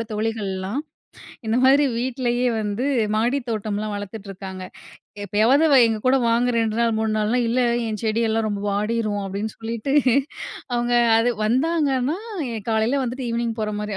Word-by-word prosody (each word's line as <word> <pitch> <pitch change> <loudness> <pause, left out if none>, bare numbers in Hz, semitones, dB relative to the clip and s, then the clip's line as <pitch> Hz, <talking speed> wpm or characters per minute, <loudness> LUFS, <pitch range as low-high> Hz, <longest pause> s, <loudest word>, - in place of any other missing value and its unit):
என்னோட - - -2
தோழிகள்லாம், 210 0 -2 0.7
இந்த 225 - +2
மாதிரி 275 +3 +6
வீட்டுலயே 245 0 -1
வந்து 210 +4 -2 0.3
மாடித் 240 +4 0
தோட்டம்லாம் 215 -1 -3
வளர்த்துட்டு 205 0 -8
இருக்காங்க. 190 -1 -7 0.6
எப்பயாவது 225 - +3 0.2
எங்ககூட 225 +4 +1
வாங்க 235 +2 +2
2 225 0 -1
நாள் 230 -1 +2
3 220 -1 0
நாள்னா, 220 +4 +1
இல்ல 245 +2 +1 0.3
என் 215 -2 -4
செடி 220 +1 +1
எல்லாம் 220 0 0
ரொம்ப 200 -1 -3
வாடிரும் 210 0 -1
அப்பிடின்னு 200 +3 -4
சொல்லிட்டு 230 +4 -3 0.8
அவுங்க 240 0 0 0.2
அது 240 +2 +2
வந்தாங்கன்னா 275 - +1 0.5
காலையில 225 +5 +1
வந்து 250 +2 -4
ஈவ்னிங் 230 -1 -2
போறமாரி 210 -1 -3
225 Hz, 140 wpm, -22 LUFS, 210-245 Hz, 0.8 s, மாதிரி